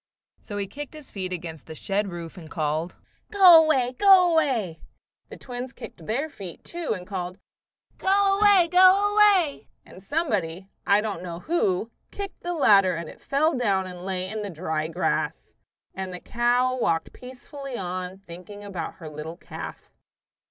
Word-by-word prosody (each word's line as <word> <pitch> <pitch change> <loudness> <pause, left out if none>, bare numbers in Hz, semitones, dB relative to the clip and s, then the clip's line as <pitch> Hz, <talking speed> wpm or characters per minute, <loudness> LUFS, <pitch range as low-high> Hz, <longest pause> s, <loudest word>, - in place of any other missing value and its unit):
So 205 - -7
he 200 - -1
kicked 290 +8 -8
his 300 -3 -11
feet 185 -2 -4
against 165 -4 -6
the 160 - -8
shed 200 +6 -1
roof 170 -3 -7
and 165 -4 -11
called, 155 +1 -2 0.4
"Go 360 -5 +8
away! 260 -6 +1
go 380 -3 +7
away!" 235 - 0 0.5
The - - -10
twins 250 0 -7
kicked 160 - -11
their 270 +8 -1
feet, 195 - -10
too, 340 -9 -3
and 180 - -10
called, 185 -1 -5 0.6
"Go 390 +1 +3
away! 400 -4 +6
go 375 +3 +6
away!" 400 -8 +4 0.2
and 185 - -14
somebody, 195 - -2 0.2
I 200 +1 +5
don't 210 -4 -4
know 175 -1 -7
who, 225 - 0 0.2
kicked 400 -2 -7
the 350 0 -3
ladder 195 - +5
and 165 -1 -6
it - - -14
fell 305 +3 +1
down 200 -6 +1
and 180 -1 -9
lay 185 -1 -2
in 215 +2 -4
the 205 - -4
dry 160 -2 -3
grass. 170 +3 -2 0.4
And 190 -1 -5
the 180 - -6
cow 245 +3 +1
walked 165 -7 0
peacefully 260 +1 -9
on, 185 0 -4
thinking 185 +4 -10
about 185 -5 -5
her 165 -4 -10
little 155 +2 -7
calf. - - -9
205 Hz, 165 wpm, -25 LUFS, -, 0.6 s, Go